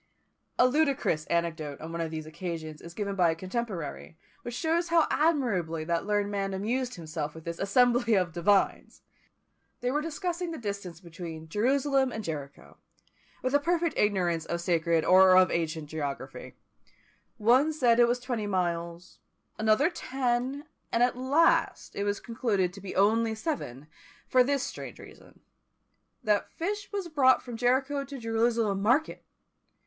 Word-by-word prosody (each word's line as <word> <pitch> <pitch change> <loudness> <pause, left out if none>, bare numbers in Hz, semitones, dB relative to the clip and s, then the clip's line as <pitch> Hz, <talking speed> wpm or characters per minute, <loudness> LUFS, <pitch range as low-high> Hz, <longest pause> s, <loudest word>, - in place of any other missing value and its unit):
A 250 - +6
ludicrous 270 - +1
anecdote 165 -4 -2
on 160 +1 -7
one 170 0 -3
of 165 - -2
these 155 -1 -5
occasions 160 -1 -6
is 170 0 -11
given 200 -2 -2
by 180 -3 +4
a 160 - 0
contemporary, 185 -5 -5 0.2
which 240 0 -6
shows 330 +4 0
how 335 -1 +4
admirably 215 - +1
that 170 +3 -1
learned 205 -1 0
man 195 -1 -2
amused 245 +6 -2
himself 155 -3 -5
with 160 - -10
this 170 0 -5
"assembly 240 +3 +3
of 180 -4 +1
divines!" 195 +3 +1 0.8
They 250 0 0
were 295 +2 0
discussing 345 +2 -3
the 325 - -5
distance 200 - -5
between 165 -2 -8
Jerusalem 265 - +2
and 220 - -5
Jericho, 145 -5 -7 0.7
with 255 +1 -1
a 285 - +5
perfect 335 +2 0
ignorance 180 -5 +1
of 170 - -3
sacred 170 -1 +1
or 185 0 +7
of 185 -1 +5
ancient 160 -2 -2
geography; 140 -3 -6 0.8
one 250 +8 +4
said 245 -6 +3
it 240 - +6
was 240 +1 0
twenty 240 -4 -3
miles, 175 -2 -3 0.4
another 220 +7 +3
ten, 260 -1 -2 0.3
and 230 - +3
at 245 - +2
last 265 +6 +2
it 200 - -2
was 205 0 -1
concluded 205 -6 -1
to 200 - -11
be 195 - -7
only 220 +3 +3
seven, 215 - -4 0.4
for 255 -1 +5
this 275 +1 0
strange - - -7
reason, - - -15 0.8
that 210 -1 +1
fish 400 +4 -4
was 400 -3 -3
brought 275 -5 +4
from 245 -2 -7
Jericho 265 +4 +1
to 275 0 -8
Jerusalem 225 -3 0
market! 255 +10 +1
210 Hz, 155 wpm, -28 LUFS, 170-260 Hz, 0.8 s, or